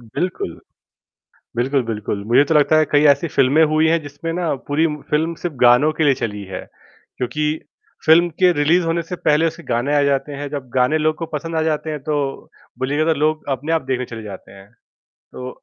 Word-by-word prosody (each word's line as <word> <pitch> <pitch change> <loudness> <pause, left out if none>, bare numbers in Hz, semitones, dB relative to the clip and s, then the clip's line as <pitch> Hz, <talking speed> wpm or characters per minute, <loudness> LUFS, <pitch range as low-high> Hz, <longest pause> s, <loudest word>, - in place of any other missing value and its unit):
बिल्कुल। 120 - -4 1.0
बिल्कुल, 130 +2 +1
बिल्कुल, 105 -2 -4
मुझे 120 +6 +4
तो 160 - +2
लगता 150 +1 +4
है, 155 - +4
कई 145 0 +4
ऐसी 170 +3 -3
फिल्में 140 +4 +3
हुई 155 +1 +3
हैं, 165 +1 +2
जिसमें 145 +3 -6
ना 170 -2 -1
पूरी 150 +3 +2 0.2
फिल्म 160 +3 +1
सिर्फ़ 175 -4 -3
गानों 125 +6 +5
के 160 0 0
लिए 140 -2 +4
चली 105 -4 -4
है। 95 - -6 0.6
क्योंकि 150 +4 -2 0.6
फ़िल्म 170 +2 +6
के 180 -1 +5
रिलीज़ 165 +4 +2
होने 165 +1 0
से 180 +2 -6
पहले 155 +1 +2
उसके 165 +1 -4
गाने 125 +4 0
आ 145 - +3
जाते 140 +1 0
हैं। 145 +1 -5
जब 140 -3 -6
गाने 130 +5 +3
लोग 155 0 +1
को 165 - -5
पसंद 165 +2 -5
आ 160 - +1
जाते 155 0 -1
हैं, 150 -2 -4
तो 145 -2 -3 0.3
बोलिएगा 145 +5 +1
लोग 155 +1 0
अपने 155 +5 -4
आप 165 - +1
देखने 125 -1 -1
चले 115 -2 -8
जाते 100 -2 -10
हैं। 95 0 -15 0.6
तो 125 0 -7
150 Hz, 200 wpm, -20 LUFS, 130-160 Hz, 1.0 s, फ़िल्म